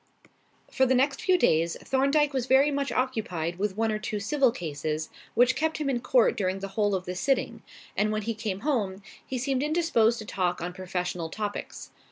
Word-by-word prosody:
For 265 - +3
the 260 - +3
next 270 +2 +1
few 370 -1 +3
days, 165 - +2
Thorndyke 280 +2 +2
was 260 -2 -1
very 270 +3 +5
much 280 0 -1
occupied 180 -10 -2
with 205 -1 -1
one 225 0 +1
or 215 - -1
two 215 0 -3
civil 260 +5 +2
cases, 155 -3 -4 0.3
which 245 +1 +4
kept 315 0 0
him 290 -3 -1
in 245 - 0
court 250 -1 +3
during 190 -1 -1
the 195 0 -6
whole 205 0 +1
of 185 -1 -3
the 180 - -4
sitting; 265 +10 0 0.3
and 215 0 +1
when 215 0 -1
he 230 - -1
came 210 -3 -4
home, 210 -9 -1 0.2
he 260 - -4
seemed 265 +1 0
indisposed 300 -8 +2
to 215 - -7
talk 180 -3 -1
on 175 +1 -4
professional 180 -2 -3
topics. 210 +3 -5
220 Hz, 200 wpm, -27 LUFS, 185-265 Hz, 0.3 s, very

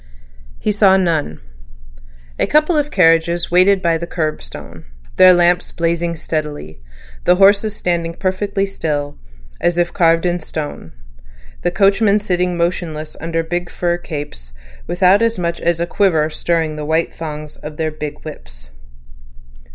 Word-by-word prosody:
He - - -1
saw 195 -2 +4
none. 160 - -1 1.0
A - - +1
couple 305 +3 +3
of 295 -1 +1
carriages 170 - +2
waited 185 +2 +4
by 165 -1 +2
the 170 - -5
curbstone, 155 -3 -5 0.3
their 185 0 +8
lamps 175 0 +2
blazing 170 0 -1
steadily, 150 - -5 0.4
the 180 - +5
horses 200 +3 +4
standing 170 -3 -2
perfectly 195 +1 -1
still, 145 -6 -3 0.5
as 175 0 +1
if 175 0 0
carved 165 -1 +3
in 175 0 0
stone, 155 - -6 0.7
the - - +1
coachmen 200 +3 +3
sitting 180 -3 -1
motionless 170 -3 -2
under 165 0 -1
the 165 - -17
big 175 0 -2
fur 175 0 -1
capes, 145 - -7 0.3
without 185 +3 +3
as 230 -1 +1
much 170 -1 -2
as 170 -1 +1
a 170 - 0
quiver 165 -4 +1
stirring 160 -1 -1
the 150 - -4
white 160 +2 0
thongs 150 -2 -7
of 150 0 -9
their 160 -1 -1
big 150 -1 -6
whips. - - -10
170 Hz, 145 wpm, -18 LUFS, 155-185 Hz, 1.0 s, their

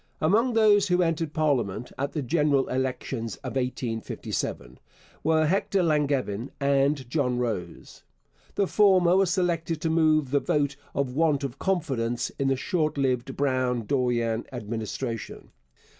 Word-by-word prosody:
Among 225 +10 +2
those 210 -3 +4
who 180 -1 +2
first 180 - +3
entered 165 -2 -1
parliament 125 - -1
at 140 +1 -3
the 150 - -2
general 145 0 +2
elections 125 -3 -3
of 125 -4 -5
1857 115 - -3 0.4
were 155 0 +3
Hector 190 +2 +1
Langevin 140 -7 0
and 140 -1 +1
John 125 -2 0
Rose. 110 -9 -4 0.5
The 200 - +2
former 185 -3 +4
was 190 -2 +3
selected 170 -3 0
to 160 - 0
move 155 -4 +3
the 140 - +3
vote 145 -1 0 0.2
of 135 -3 -1
want 150 -3 +2
of 135 -1 -5
confidence 130 -11 -1
in 135 - +1
the 135 - +2
short 155 +1 -1
lived 130 -1 -1
Brown 130 -4 0
Dorion 120 -3 0
Administration. 115 0 -5
140 Hz, 140 wpm, -26 LUFS, 125-160 Hz, 0.5 s, those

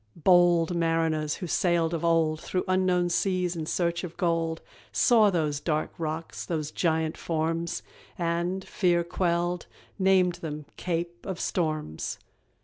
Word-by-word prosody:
Bold 175 0 +4
mariners 165 -2 +1
who 185 - -6
sailed 170 -1 +1
of 165 - -2
old 160 -2 +2
Through 180 - -2
unknown 185 -1 +2
seas 180 0 0
in 160 -2 -4
search 170 +1 0
of 175 -2 -7
gold, 165 -2 0 0.3
Saw 225 -4 +5
those 155 -6 0
dark 155 0 -1
rocks, 160 0 -4
those 155 -3 -3
giant 160 -2 0
forms, 165 +1 -2 0.3
And, 175 +2 -1
fear 175 -3 +2
quelled, 175 0 -1 0.3
named 185 -2 +3
them 150 -2 -5
"Cape 175 0 -3
of 190 -2 -4
Storms." 155 - -2
170 Hz, 135 wpm, -27 LUFS, 160-180 Hz, 0.3 s, Saw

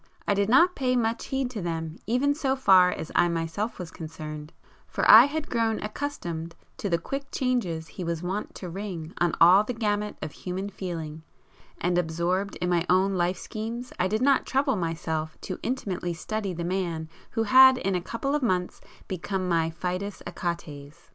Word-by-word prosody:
I - - +3
did 200 +1 +1
not 340 +9 +6
pay 255 -2 +1
much 230 -1 0
heed 265 -2 -2
to 220 -5 -5
them 165 -2 -4
even 255 +5 +2
so 275 -3 0
far 190 -8 +6
as 160 - -5
I 175 - +4
myself 170 +7 -2
was 180 -2 -7
concerned, 155 -2 -8 0.4
for - - -1
I 225 +3 +11
had 300 +1 -3
grown 225 -2 0
accustomed 175 - -4 0.2
to 225 -6 -3
the 170 - +2
quick 275 +11 -5
changes 205 -12 -1
he 180 - -7
was 170 0 -3
wont 190 +4 -3
to 185 - -7
ring 180 -4 -6
on 175 -2 +2
all 180 +5 +7
the 245 +3 -4
gamut 210 -2 -1
of 155 - -5
human 190 +5 -5
feeling, 165 -5 -5 0.6
and 175 0 +1
absorbed 180 +4 -1
in 180 - -2
my 170 -1 +2
own 190 +2 +3
life 180 0 0
schemes 230 +5 -6
I 180 - +3
did 215 +5 0
not 275 -1 +3
trouble 270 -1 +1
myself 160 -3 -3
to - - -5
intimately 185 -8 -3
study 205 +4 -3
the 170 -1 -4
man 175 -3 -2 0.2
who 225 - -1
had 260 +3 +8
in 195 -5 -1
a 180 - 0
couple 235 +9 -3
of 295 - +1
months 185 -7 -1 0.3
become 185 +1 -3
my 165 -2 +2
fidus 180 +4 -4
Achates. 150 -4 -5
185 Hz, 185 wpm, -26 LUFS, 170-230 Hz, 0.6 s, I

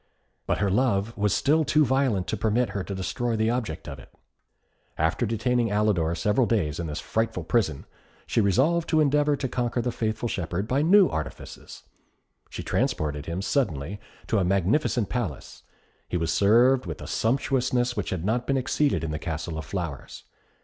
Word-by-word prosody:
But - - +1
her 100 -2 0
love 115 -1 +1
was 105 0 +1
still 155 +3 +3
too 150 +1 +3
violent 130 -8 +1
to - - 0
permit 115 +1 +1
her 100 -2 -3
to 100 - -5
destroy 115 +5 -2
the 110 +1 +1
object 115 -10 -3
of - - -7
it. - - -15 0.9
After 80 +9 +1
detaining 115 +2 0
Alidor 100 -6 +1
several 105 +8 +2
days 80 -10 0
in 85 - -3
this 75 0 -4
frightful 110 -5 -2
prison, 80 - 0 0.4
she 115 - +1
resolved 145 - +2
to 160 - +3
endeavour 145 0 +3
to 140 -1 -3
conquer 120 -1 -1
the 120 +1 -1
faithful 110 0 -2
shepherd 90 0 -3
by 135 +4 +1
new 185 +4 +6
artifices. 75 -3 -7 0.7
She - - -6
transported 75 -1 -1
him 85 +3 -3
suddenly 100 - -1 0.3
to 110 - +1
a - - +2
magnificent 100 - +1
palace. 105 - -4 0.5
He 90 - -1
was 80 -1 -1
served 120 +7 +4
with 80 - -5
a - - -8
sumptuousness 125 0 0
which - - -3
had 90 -2 -3
not 120 +4 0
been 135 - +2
exceeded 140 - 0
in 80 - -3
the 75 - -3
Castle 80 -1 -4
of 80 - -7
Flowers. - - -6
110 Hz, 175 wpm, -26 LUFS, 90-125 Hz, 0.9 s, new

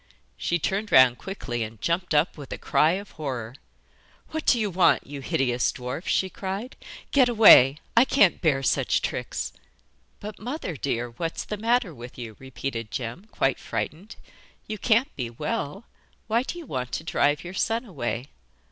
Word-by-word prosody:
She 175 - 0
turned 195 +6 -2
round 130 -2 +6
quickly 140 -11 -5
and 110 -1 -5
jumped 170 -1 -1
up 150 +4 +2
with 145 -3 -10
a - - -4
cry 155 +2 +3
of 200 +2 -5
horror. 125 -7 -5 0.8
'What 315 0 -4
do 240 - +5
you 210 -3 0
want, 180 +1 +3
you 140 0 -7
hideous 125 -2 +1
dwarf?' 125 +6 -6
she 190 - +2
cried; 195 +6 -5 0.4
'get 260 -3 +5
away; 180 - +8 0.2
I 235 - +8
can't 205 -10 +4
bear 140 -5 +2
such - - +1
tricks.' - - -3 0.7
'But, 210 0 -8
mother 245 - -4
dear, 120 -3 -2
what's 165 +8 -4
the 210 - -4
matter 225 -3 +1
with 120 -2 -11
you?' 115 -3 -7
repeated 125 -3 -5
Jem, 125 - -5
quite 135 - 0
frightened. 155 - -5 0.5
'You 215 -1 -5
can't 235 +4 +2
be 125 -4 -3
well. 150 - -4 0.4
Why 230 +2 +2
do 265 - -5
you 340 - -8
want 125 - -4
to - - -2
drive 145 -2 +1
your 175 +1 -7
son 225 +5 0
away? 120 - -4
160 Hz, 170 wpm, -25 LUFS, 125-210 Hz, 0.8 s, away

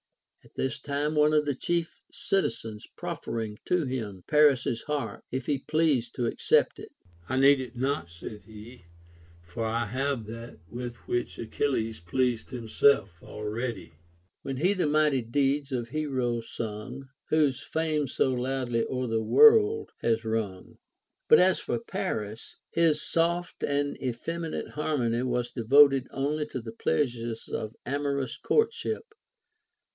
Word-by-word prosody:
At - - -22
this 135 +2 -2
time 145 +2 -1
one 150 0 +4
of 150 -1 +3
the 145 - 0
chief 170 +5 -2
citizens 110 - -2
proffering 110 -2 -4
to 180 -4 +1
him 110 -8 -4
Paris's 140 -6 +4
harp, 130 -8 -3
if 130 0 -3
he 145 -2 0
pleased 150 -5 +1
to 120 - -1
accept 115 - +2
it; - - -10 0.4
I 130 - 0
need 140 0 +6
it 125 -2 -8
not, 125 -9 -1
said 85 +5 -9
he, 110 -1 -12 0.6
for 90 +6 -5
I 115 +1 0
have 130 +1 -2
that 115 +2 -8
with 120 +4 -6
which 120 0 -2
Achilles 115 -1 -1
pleased 120 +7 -1
himself 120 -6 +2
already, 105 -3 -5 0.5
When 135 -1 -4
he 180 +8 +3
the 185 -6 0
mighty 150 -3 +3
deeds 140 +4 0
of 120 -3 -2
heroes 125 -6 -2
sung, 115 +5 -6 0.2
Whose 145 -4 +2
fame 155 -2 0
so 130 +1 +1
loudly 125 -2 -1
o'er 130 -1 -1
the 115 -2 0
world 440 - +6
has 115 -1 0
rung; 110 -4 -2
t - - -27 0.5
but - - +8
as 185 0 +4
for 120 - -2
Paris, 110 -1 -4
his 165 -2 +3
soft 170 +1 0
and 145 0 -1
effeminate 160 +7 -3
harmony 135 -6 0
Avas 125 -1 -1
de 120 - -3
voted 135 +2 +6
only 150 +2 -1
to 130 - -5
the 115 -1 -7
pleasures 115 - -1
of 110 +1 -4
amorous 140 -1 -2
courtship. 445 0 0
130 Hz, 145 wpm, -28 LUFS, 115-150 Hz, 0.6 s, but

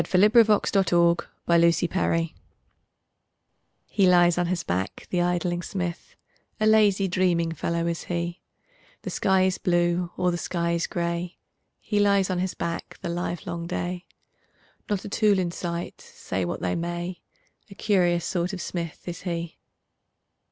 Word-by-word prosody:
Helen 195 +3 +4
Hunt 230 -3 +7
Jackson 205 -2 +3
The 170 -1 +2 0.2
Poet's 170 0 +4
Forge 165 -2 0 1.5
HE 195 -3 +2
lies 175 -1 +5
on 175 - +1
his 175 -1 -1
back, 95 +2 -3
the 180 - +1
idling 175 0 0
smith, 175 -1 -5 0.4
A 215 - +2
lazy, 210 -3 +4
dreaming 175 -2 +1
fellow 170 +1 -2
is 170 -1 -3
he; 170 0 -3 0.6
The - - -4
sky 190 -1 +2
is 185 -1 +1
blue, 175 0 +1
or 180 0 +2
the 175 - -3
sky 170 -1 -1
is 170 0 0
gray, 170 0 -3 0.4
He 210 - -1
lies 200 -2 +3
on 180 - -1
his 185 0 -2
back 170 0 -4
the - - -2
livelong 170 -1 -4
day, 180 0 -4 0.8
Not 205 -2 -1
a - - -4
tool 210 -1 +3
in 180 -2 0
sight, 170 0 -5
say 95 -1 -4
what 85 - -4
they 90 - 0
may, 175 +1 -4 0.5
A 195 - -12
curious 175 -5 +2
sort 180 0 -1
of 190 - -4
smith 170 -1 -5
is 175 0 -5
he. 170 -2 -4
175 Hz, 155 wpm, -25 LUFS, 170-185 Hz, 1.5 s, Hunt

